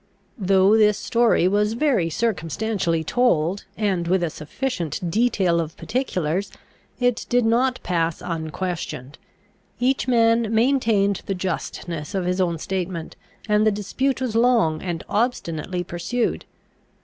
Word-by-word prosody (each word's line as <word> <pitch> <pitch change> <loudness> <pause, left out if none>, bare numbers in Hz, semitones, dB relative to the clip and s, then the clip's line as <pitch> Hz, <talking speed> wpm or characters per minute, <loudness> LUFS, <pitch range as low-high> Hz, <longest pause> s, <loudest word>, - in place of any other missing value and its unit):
Though 195 +1 +4
this 210 -1 +4
story 230 -6 +2
was 210 +2 +1
very 235 - +1
circumstantially 180 -3 -1
told, 185 -3 +1
and 190 -5 0
with 180 0 +2
a 165 - -1
sufficient 170 - -4
detail 195 -6 +2
of 165 +2 -7
particulars, 195 - -2 0.5
it 245 -1 0
did 245 -1 +3
not 250 +3 +2
pass 165 -2 0
unquestioned. 165 -5 -5 0.6
Each 260 +2 +1
man 230 -2 +3
maintained 225 -5 +2
the 195 - -1
justness 175 -2 -4
of 190 -2 -1
his 180 +1 0
own 170 -2 0
statement, 180 -1 -4 0.3
and 210 0 +3
the 215 - +4
dispute 255 +7 -1
was 245 -4 -2
long 230 -10 +3
and 175 -3 -4
obstinately 180 -6 -1
pursued. 175 +8 -2
195 Hz, 125 wpm, -23 LUFS, 170-230 Hz, 0.6 s, Though